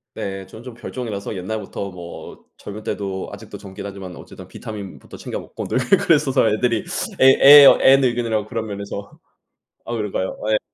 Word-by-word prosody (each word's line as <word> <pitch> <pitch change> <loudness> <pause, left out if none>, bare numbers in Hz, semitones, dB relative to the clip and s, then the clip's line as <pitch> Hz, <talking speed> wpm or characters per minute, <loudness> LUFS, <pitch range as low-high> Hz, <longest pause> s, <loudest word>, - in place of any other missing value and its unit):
네. 95 -3 -5
저는 110 - -12
좀 125 -2 -9
별종이라서 110 -4 -6
옛날부터 100 0 -5
뭐 85 -1 -10
젊을 105 +1 -9
때도 95 -2 -4
아직도 105 +1 -10
젊긴 100 0 -9
하지만 95 -3 -8
어쨌든 - - -12
비타민부터 100 -3 -9
챙겨 - - -6
먹고 - - -8
늘 - - -1 0.2
그랬어서 150 - +3
애들이 115 0 0 0.4
애 - - +7 0.4
애 - - +8 0.2
애늙은이라고 120 -5 +1
그런 115 -1 -4
면에서. 100 0 -7 0.7
아 120 - -5
그런가요? 105 -3 -3
예. 110 - +3
105 Hz, 365 characters per minute, -21 LUFS, 100-115 Hz, 0.7 s, 애